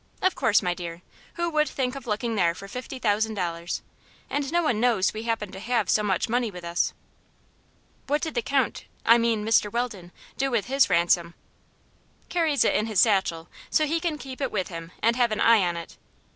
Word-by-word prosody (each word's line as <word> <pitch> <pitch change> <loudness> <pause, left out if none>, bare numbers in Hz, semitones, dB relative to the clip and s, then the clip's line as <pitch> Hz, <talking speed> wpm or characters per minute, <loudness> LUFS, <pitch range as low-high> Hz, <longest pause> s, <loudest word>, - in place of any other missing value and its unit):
"Of 375 - +2
course, 210 -2 +2
my 180 - +1
dear. 170 0 -7 0.3
Who 345 0 -1
would 305 -2 +2
think 255 -2 -2
of 270 -3 -9
looking 225 +2 -1
there 170 -5 +2
for 195 - -9
fifty 250 +5 -7
thousand 220 -2 +1
dollars? 170 -2 -3 0.5
And 285 -1 -1
no 345 +1 +2
one 245 -9 +1
knows 225 -5 +2
we 215 - -5
happen 210 -4 -1
to 190 - -8
have 235 +4 0
so 215 - +3
much 195 -1 0
money 240 0 0
with 180 -3 -10
us." 170 0 0 1.1
"What 295 +3 0
did 320 - -2
the 240 - 0
Count 270 0 0 0.2
I 230 +1 +7
mean, 230 -2 +1
Mr. 220 -2 +3
Weldon 215 -7 -3 0.3
do 270 0 +1
with 235 -5 0
his 270 +2 +3
ransom?" 170 0 +2 0.9
"Carries 320 -5 +2
it - - +3
in 215 - +1
his 215 -4 +1
satchel, 190 -6 +2 0.2
so 310 - +3
he 325 +3 0
can 330 -3 -2
keep 265 0 -9
it 275 - -1
with 190 -4 -2
him 165 -1 -8
and 230 +1 +4
have 240 -2 +3
an 215 - -1
eye 230 -2 +6
on 175 -1 -1
it. 170 - -9
225 Hz, 210 wpm, -26 LUFS, 190-260 Hz, 1.1 s, I